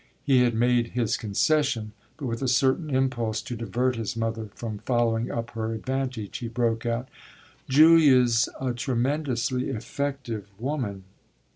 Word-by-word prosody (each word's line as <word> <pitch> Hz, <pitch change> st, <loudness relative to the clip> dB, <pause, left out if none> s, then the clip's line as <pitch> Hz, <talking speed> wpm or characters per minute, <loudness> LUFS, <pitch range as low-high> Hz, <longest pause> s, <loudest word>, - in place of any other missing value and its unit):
He 135 Hz, -4 st, +4 dB
had 120 Hz, -2 st, +2 dB
made 120 Hz, 0 st, +2 dB
his 115 Hz, -4 st, +1 dB
concession, 115 Hz, +1 st, 0 dB, 0.3 s
but, 145 Hz, -, -6 dB
with 115 Hz, -1 st, -3 dB
a 135 Hz, -, 0 dB
certain 130 Hz, +5 st, +2 dB
impulse 120 Hz, -5 st, 0 dB
to 120 Hz, -, -5 dB
divert 120 Hz, +3 st, -1 dB
his 115 Hz, 0 st, -4 dB
mother 115 Hz, -1 st, -2 dB
from 110 Hz, -3 st, -5 dB
following 120 Hz, -1 st, 0 dB
up 115 Hz, 0 st, -4 dB
her 115 Hz, 0 st, -3 dB
advantage, 130 Hz, -3 st, -3 dB
he 120 Hz, -, -4 dB
broke 115 Hz, -1 st, -1 dB
out: 120 Hz, +2 st, -1 dB, 0.6 s
"Julia's 135 Hz, -6 st, +6 dB
a 130 Hz, -2 st, -1 dB
tremendously 125 Hz, 0 st, -1 dB
effective 125 Hz, -3 st, -4 dB
woman." 120 Hz, -6 st, -3 dB
120 Hz, 140 wpm, -26 LUFS, 115-130 Hz, 0.6 s, Julia's